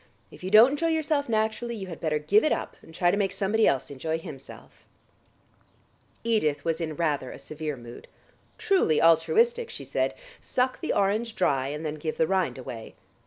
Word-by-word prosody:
If - - -14
you 185 - -3
don't 220 +6 +8
enjoy 295 +3 0
yourself 310 -4 0
naturally, 220 +2 -1
you 200 -3 -6
had 175 -3 -9
better 155 -2 0
give 155 +9 +3
it 310 - +2
up, - - -2
and - - -15
try 175 +2 +2
to 200 - 0
make 195 -2 +1
somebody 200 +3 +1
else 135 +1 0
enjoy 160 +4 -2
himself." 150 -5 -12 1.4
Edith 215 -11 0
was 165 0 -1
in 155 -2 -3
rather 150 -6 -1
a - - -9
severe 155 -2 -6
mood. 120 0 -11 0.5
"Truly 385 - +2
altruistic," 450 - +3
she - - -8
said. - - -1 0.2
"Suck 255 0 -1
the 325 - -1
orange 215 +3 0
dry, 135 -9 +1
and 150 +3 -5
then 150 - -2
give 155 0 -3
the 160 - +3
rind 185 -2 0
away." 115 -3 -8
180 Hz, 185 wpm, -27 LUFS, 155-230 Hz, 1.4 s, don't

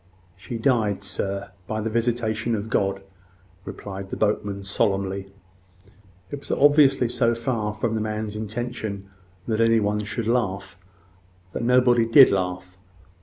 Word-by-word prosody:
"She 105 +5 -7
died, 110 -5 +1
sir, 100 +1 -4 0.2
by 110 - -2
the 110 +1 -3
visitation 115 -1 0
of 110 +1 -5
God," 95 0 0 0.6
replied 95 -1 -7
the - - -5
boatman, 105 -2 -1
solemnly. 95 -1 -1 1.0
It 145 - -4
was 140 - -14
obviously 140 -3 +4
so 115 -1 +1
far 115 -3 -2
from 110 +2 -2
the 110 - -1
man's 110 -1 -3
intention 110 -2 -5 0.4
that 110 -1 0
any 115 0 +4
one 105 0 0
should 110 +2 -4
laugh, 100 -6 -1 0.8
that - - -3
nobody 120 -1 +4
did 130 +3 +8
laugh. 90 -1 -3
110 Hz, 135 wpm, -24 LUFS, 100-115 Hz, 1.0 s, did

